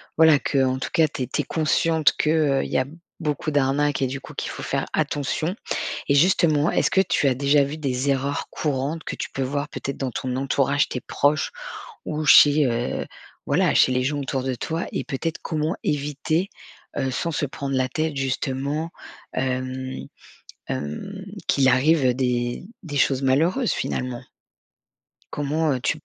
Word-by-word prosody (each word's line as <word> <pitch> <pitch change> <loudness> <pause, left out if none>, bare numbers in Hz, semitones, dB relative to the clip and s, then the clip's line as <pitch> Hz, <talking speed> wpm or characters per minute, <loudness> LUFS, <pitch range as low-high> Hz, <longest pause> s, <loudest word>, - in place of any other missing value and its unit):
voilà, 160 -2 +6
qu'en 130 -2 +1
tout - - -3
cas, 160 -2 +4
tu 135 - -4
es - - -4
tu - - -1
es - - -5
consciente 160 0 +2
que, 150 - +1 0.3
heu, - - 0
il - - -6
y - - +2
a 130 - +2 0.3
beaucoup 155 -1 -2
d'arnaques 145 0 +1
et 135 - +2
du 135 +2 -5
coup, - - -11
qu'il - - -4
faut - - -7
faire - - -1
attention. 150 +2 -1 0.6
Et 140 - +4
justement, 155 -1 +4
est-ce - - +2
que 190 - +4
tu 150 -6 +2
as 130 - +2
déjà 140 +2 +4
vu 140 +3 -3
des 135 -2 0
erreurs 140 +1 -1
courantes 150 +2 -2
que - - -4
tu - - -5
peux 135 - -3
voir, 140 +2 -2
peut-être, 140 - -5
dans 135 -2 -2
ton 125 +1 -3
entourage, 140 +2 +1
tes 125 - -4
proches 145 +4 +1 0.5
ou 155 0 -2
chez, 145 0 +7
heu, 120 0 -2 0.4
voilà, - - +3
chez - - +5
les 125 0 +1
gens 145 +2 -1
autour 135 -1 -2
de 130 0 -1
toi 160 +7 -3
et - - -2
peut-être, 160 +4 -3
comment 155 +3 -1
éviter, 150 +5 -1 0.5
heu, 135 -1 0
sans 165 +6 -2
se 150 -1 -1
prendre 140 -1 -4
la 130 -1 +1
tête 155 +2 -1
justement, 135 +4 -2 0.4
hem 130 0 -3 0.6
hem, 190 - -5 0.2
qu'il 135 -2 +3
arrive 130 0 +4
des 120 +1 -1 0.2
des 150 -6 -6
choses 135 -1 +2
malheureuses, 165 - +2
finalement? 125 -1 -3 1.1
Comment, 150 +2 0
heu, 130 - -2
tu 155 - 0
140 Hz, 175 wpm, -24 LUFS, 130-155 Hz, 1.1 s, chez